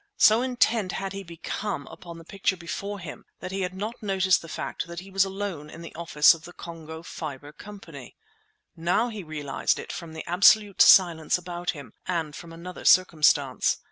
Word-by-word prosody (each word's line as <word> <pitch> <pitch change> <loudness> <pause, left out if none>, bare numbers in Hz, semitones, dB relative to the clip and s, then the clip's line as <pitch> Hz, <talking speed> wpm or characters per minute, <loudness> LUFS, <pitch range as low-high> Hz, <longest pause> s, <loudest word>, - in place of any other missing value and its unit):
So 220 +2 +6
intent 235 -6 +1
had 195 0 -4
he 195 - -5
become 190 +4 -5
upon 170 -2 -11
the 165 - -11
picture 195 +1 -1
before 200 +4 -5
him 175 -5 -9 0.2
that 185 - -6
he 195 0 -3
had 185 0 -3
not 215 +6 -5
noticed 190 -3 +2
the 165 - -11
fact - - -4
that 170 0 -7
he 195 +1 -13
was 195 0 +3
alone 190 -6 -5
in 165 +2 -10
the 170 - -10
office 155 -3 +5
of 165 -1 -11
the 175 0 -11
Congo 160 -2 -9
Fibre 145 -4 -7
Company. 205 +4 -11 0.6
Now 180 +8 +1
he 215 -3 -6
realized 150 -4 -1
it - - -7
from 170 -3 -8
the 160 - -7
absolute 200 +3 +5
silence 170 -4 +6
about 175 0 -6
him, 135 -6 -11
and 165 -4 -2
from 170 -1 -10
another 170 +2 -9
circumstance. 150 -7 +4
175 Hz, 185 wpm, -26 LUFS, 160-195 Hz, 0.6 s, So